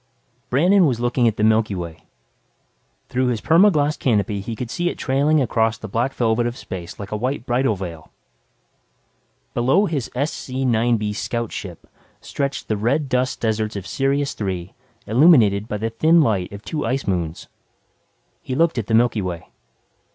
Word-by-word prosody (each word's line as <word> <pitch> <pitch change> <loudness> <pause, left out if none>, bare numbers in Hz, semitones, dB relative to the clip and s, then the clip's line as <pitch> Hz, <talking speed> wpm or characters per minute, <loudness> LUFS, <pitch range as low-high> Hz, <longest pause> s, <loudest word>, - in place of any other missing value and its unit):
_ - - -43
Brandon 175 +7 +4
was 125 -4 -1
looking 120 0 +2
at 110 - 0
the 105 - 0
Milky 110 -2 +3
Way. 85 -3 -7 1.0
Through 130 0 0
his 120 -3 0
perma 175 - +5
glas 150 -2 +1
canopy, 105 -6 0
he 115 +3 -5
could 120 +1 -6
see 175 +5 0
it - - -6
trailing 145 +4 +2
across 115 -4 +1
the 110 - -8
black 115 +6 -1
velvet 120 0 +1
of 120 +2 -5
space 90 -6 -8
like 100 -1 -7
a - - -1
white 125 +3 -2
bridal 120 -2 +1
veil. 85 -5 -8 1.4
Below 135 +12 +3
his 150 - -2
SC9B 120 -6 0
scout 115 +1 -3
ship 90 -4 -8 0.3
stretched 140 -1 -4
the 110 - -1
red 130 +7 0
dust 125 0 0
deserts 110 -1 -1
of 100 -2 -5
Sirius 140 +8 0
Three 95 -3 -4 0.3
illuminated 110 - +4
by 105 - -3
the 115 +2 -3
thin 160 +9 +4
light 105 - +1
of 100 +1 -9
two 155 - -3
ice 135 +1 -1
moons. 85 -4 -3 0.9
He 130 - -4
looked 165 -3 +2
at 110 - -4
the 110 - +2
Milky 115 -2 +3
Way. 90 -3 -5
115 Hz, 170 wpm, -21 LUFS, 105-135 Hz, 1.4 s, perma